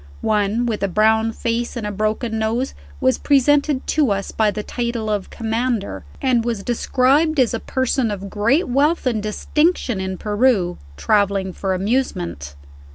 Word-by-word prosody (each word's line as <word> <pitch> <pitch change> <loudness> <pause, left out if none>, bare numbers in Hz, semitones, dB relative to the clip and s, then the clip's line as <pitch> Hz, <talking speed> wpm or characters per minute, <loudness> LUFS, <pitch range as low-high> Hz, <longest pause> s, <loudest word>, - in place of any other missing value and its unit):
One, 215 +2 +1
with 225 -3 -2
a 200 - +1
brown 220 +4 +2
face 235 +2 -2
and 225 - -4
a 210 - -2
broken 215 +2 -1
nose, 230 +4 -1 0.3
was 260 -1 +2
presented 285 0 +2
to 300 -5 +2
us 200 -1 -2
by 220 -1 +2
the 210 0 -4
title 235 -2 -3
of 205 -2 -2
"Commander," 230 -1 -2
and 250 -4 +2
was 230 -4 -2
described 270 +6 +2
as 250 -3 +3
a - - -1
person 260 -2 0
of 200 -1 -5
great 230 - +1
wealth 285 +6 +1
and 230 -4 0
distinction 245 - 0
in 190 0 -3
Peru, 210 -4 +1 0.2
traveling 200 - +1
for 190 0 -2
amusement. 90 - -2
225 Hz, 160 wpm, -20 LUFS, 205-255 Hz, 0.3 s, as